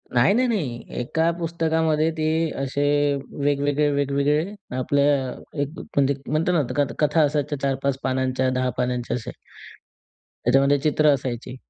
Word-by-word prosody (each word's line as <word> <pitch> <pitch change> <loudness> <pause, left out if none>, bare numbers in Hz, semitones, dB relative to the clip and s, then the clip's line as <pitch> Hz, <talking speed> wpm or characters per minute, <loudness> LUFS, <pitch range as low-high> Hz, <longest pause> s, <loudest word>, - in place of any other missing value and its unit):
नाही, 120 +10 +5
नाही, 255 +3 +2
नाही. 150 - -2 0.2
एका 160 +7 +1
पुस्तकामध्ये 160 -1 +1
ते 155 - -1 0.4
असे 135 +1 -1 0.6
वेगवेगळे-वेगवेगळे 145 +3 +1 0.2
आपल्या 140 +2 +2 0.6
एक 145 +4 -4
म्हणजे 140 0 0
म्हणतो 155 +5 +1
ना, 170 - +3 0.2
कथ 145 -2 +1
कथा 155 +1 +3
असायच्या 145 -1 -1
4-5 135 0 0
पानांच्या, 130 0 0
10 130 0 0
पानांच्या 125 -1 -1
असे. 115 - -7 1.1
त्याच्यामध्ये 135 +3 +4
चित्र 155 +1 +2
असायची. 125 -1 -5
140 Hz, 125 wpm, -23 LUFS, 130-155 Hz, 1.1 s, नाही